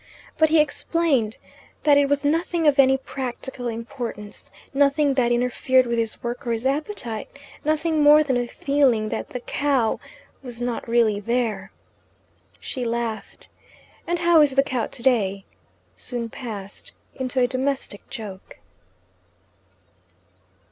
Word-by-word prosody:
But 315 Hz, -1 st, +4 dB
he 320 Hz, 0 st, +5 dB
explained 300 Hz, -7 st, +1 dB, 0.5 s
that 295 Hz, -2 st, +6 dB
it 285 Hz, -1 st, +4 dB
was 285 Hz, 0 st, +1 dB
nothing 330 Hz, +2 st, +1 dB
of 285 Hz, -1 st, +4 dB
any 265 Hz, 0 st, +6 dB
practical 260 Hz, -1 st, -6 dB
importance, 230 Hz, -3 st, -6 dB, 0.2 s
nothing 285 Hz, +1 st, +3 dB
that 245 Hz, -3 st, +2 dB
interfered 250 Hz, +1 st, +2 dB
with 235 Hz, -1 st, -1 dB
his 225 Hz, -1 st, -3 dB
work 240 Hz, +1 st, -4 dB
or 235 Hz, -, +1 dB
his 230 Hz, +2 st, -4 dB
appetite, 270 Hz, -, -2 dB, 0.4 s
nothing 310 Hz, +1 st, +1 dB
more 300 Hz, +1 st, +7 dB
than 270 Hz, -4 st, 0 dB
a 245 Hz, 0 st, 0 dB
feeling 255 Hz, -6 st, +1 dB
that -, -, -4 dB
the 250 Hz, -, -5 dB
cow 270 Hz, -4 st, 0 dB, 0.4 s
was 245 Hz, -3 st, -7 dB
not 245 Hz, -1 st, -3 dB
really 230 Hz, -3 st, +3 dB
there. 215 Hz, -3 st, -1 dB, 0.9 s
She 255 Hz, -, -5 dB
laughed, 230 Hz, -1 st, -4 dB, 0.6 s
and 345 Hz, +1 st, 0 dB
"how 340 Hz, -2 st, +5 dB
is 285 Hz, -3 st, +3 dB
the 275 Hz, -, +5 dB
cow 255 Hz, -4 st, -2 dB
today?" 210 Hz, -6 st, 0 dB, 0.5 s
soon 235 Hz, -2 st, -4 dB
passed 205 Hz, -6 st, -7 dB, 0.2 s
into 260 Hz, -1 st, -2 dB
a 250 Hz, -, +5 dB
domestic 260 Hz, -4 st, -2 dB
joke. 200 Hz, -4 st, -8 dB
255 Hz, 135 wpm, -23 LUFS, 230-285 Hz, 0.9 s, more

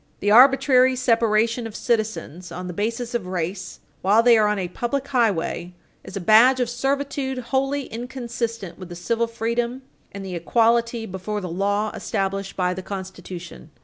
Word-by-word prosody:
562 205 Hz, -, -3 dB
The -, -, +4 dB
arbitrary 260 Hz, +1 st, +6 dB
separation 230 Hz, -1 st, +2 dB
of 220 Hz, -, -11 dB
citizens 215 Hz, -7 st, -2 dB
on 180 Hz, +1 st, -6 dB
the 180 Hz, -, -5 dB
basis 230 Hz, +5 st, -3 dB
of 225 Hz, -6 st, -2 dB
race 180 Hz, +1 st, -4 dB, 0.2 s
while 210 Hz, +4 st, +4 dB
they 240 Hz, -1 st, +7 dB
are 215 Hz, -1 st, +4 dB
on 210 Hz, 0 st, 0 dB
a 185 Hz, -2 st, -2 dB
public 245 Hz, +9 st, -3 dB
highway 195 Hz, -8 st, 0 dB, 0.3 s
is 190 Hz, -, -7 dB
a -, -, -2 dB
badge 225 Hz, +7 st, +6 dB
of 245 Hz, -1 st, 0 dB
servitude 270 Hz, +1 st, -2 dB
wholly 270 Hz, +3 st, -1 dB
inconsistent 235 Hz, -5 st, -5 dB
with 185 Hz, -2 st, -9 dB
the 175 Hz, -, -7 dB
civil 230 Hz, +7 st, -1 dB
freedom 235 Hz, +3 st, -2 dB, 0.3 s
and 195 Hz, 0 st, -7 dB
the 185 Hz, -, -6 dB
equality 230 Hz, +5 st, +1 dB
before 190 Hz, +2 st, -4 dB
the 185 Hz, -3 st, -5 dB
law 200 Hz, +4 st, 0 dB
established 195 Hz, 0 st, -3 dB
by 180 Hz, -1 st, 0 dB
the 190 Hz, -, -6 dB
Constitution. 185 Hz, -3 st, -8 dB
225 Hz, 170 wpm, -23 LUFS, 190-245 Hz, 0.3 s, they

